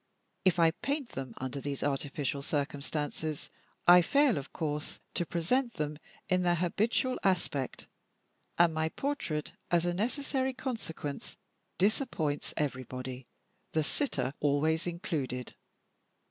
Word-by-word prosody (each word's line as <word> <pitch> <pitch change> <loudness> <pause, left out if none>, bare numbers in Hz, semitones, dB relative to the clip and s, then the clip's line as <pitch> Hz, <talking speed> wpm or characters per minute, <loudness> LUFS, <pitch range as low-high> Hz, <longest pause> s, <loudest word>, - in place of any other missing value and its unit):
If 185 -2 +5
I 165 -1 +6
paint 280 - -2
them, 130 -3 -6
under 130 +1 -3
these 140 -1 -3
artificial 140 0 -1
circumstances, 145 +1 -2 0.3
I 175 0 +10
fail 275 - +4
of 135 - -9
course 150 -3 -3
to 175 - 0
present 235 - +1
them 150 0 -2 0.3
in 185 0 +3
their 175 -1 +3
habitual 215 +9 +1
aspect; 170 -8 0 0.7
and 170 -1 +6
my 160 0 +1
portrait, 165 - -2 0.2
as 175 0 +3
a 175 - +1
necessary 260 +5 0
consequence, 220 - -4 0.4
disappoints 185 - +1
everybody, 130 -2 -3 0.5
the 155 - +3
sitter 140 - 0
always 155 +3 +2
included. 145 -8 -2
160 Hz, 120 wpm, -32 LUFS, 145-190 Hz, 0.7 s, I